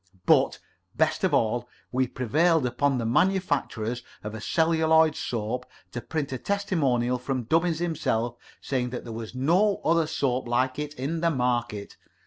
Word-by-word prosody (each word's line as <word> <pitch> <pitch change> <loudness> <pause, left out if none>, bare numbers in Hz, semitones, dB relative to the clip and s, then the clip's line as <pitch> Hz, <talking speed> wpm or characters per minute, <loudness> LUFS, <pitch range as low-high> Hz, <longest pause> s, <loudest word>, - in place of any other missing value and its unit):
But, - - +4 0.4
best - - +1
of - - +3
all, 120 +2 +1 0.2
we 130 +1 +1
prevailed 155 +6 +2
upon 135 +2 +1
the 115 - -2
manufacturers 125 - 0 0.2
of 105 0 -5
celluloid 160 -1 +3
soap 120 +2 -3 0.2
to 120 - -5
print 150 -1 -3
a 130 - -3
testimonial 135 -11 0
from 130 0 -2
Dubbins 165 +6 +1
himself, 120 -8 -1 0.3
saying 125 -2 -1
that 125 - -5
there 115 - -7
was 115 +1 -7
no 180 +10 +2
other 165 -1 +3
soap 130 -4 -1
like 130 +3 0
it 150 0 -4
in 150 +5 -2
the 170 - +3
market. 120 -7 -1
130 Hz, 150 wpm, -26 LUFS, 120-160 Hz, 0.4 s, But